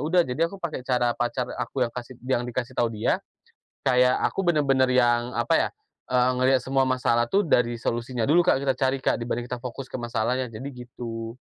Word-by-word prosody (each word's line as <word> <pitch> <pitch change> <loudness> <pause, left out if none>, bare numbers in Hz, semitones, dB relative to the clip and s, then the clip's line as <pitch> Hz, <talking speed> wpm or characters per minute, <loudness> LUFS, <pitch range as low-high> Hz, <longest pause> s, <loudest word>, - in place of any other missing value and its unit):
udah, 175 +4 +3
jadi, 125 +4 -4
aku 200 - -8
pakai 155 -7 -4
cara 125 -2 +1
pacar 120 +1 -1 0.2
aku 130 -2 -1
yang 115 - -10
kasih 125 0 -7
yang 130 -2 +1
dikasih 125 +1 -3
tahu 120 - +2
dia, 110 -1 0 0.7
kayak 125 0 +4
aku 195 - 0
benar-benar 140 -6 +3
yang, 120 -1 +3
apa 120 0 +1
ya, - - -10 0.4
eee, 125 0 +4
ngelihat 130 +1 +4
semua 135 +1 +2
masalah 125 -2 +2
tuh 200 - +4
dari 120 -4 +2
solusinya 120 0 -2
dulu 170 +5 +5
Kak, 155 - +3
kita 135 -2 +1
cari 135 0 +1
Kak, - - +2
dibanding 120 0 -3
kita 125 - -4
fokus 125 +1 -6
ke - - -7
masalahnya. 120 +1 -1
Jadi, 115 +6 -6 0.2
gitu. 115 -2 -6
125 Hz, 200 wpm, -25 LUFS, 120-135 Hz, 0.7 s, dulu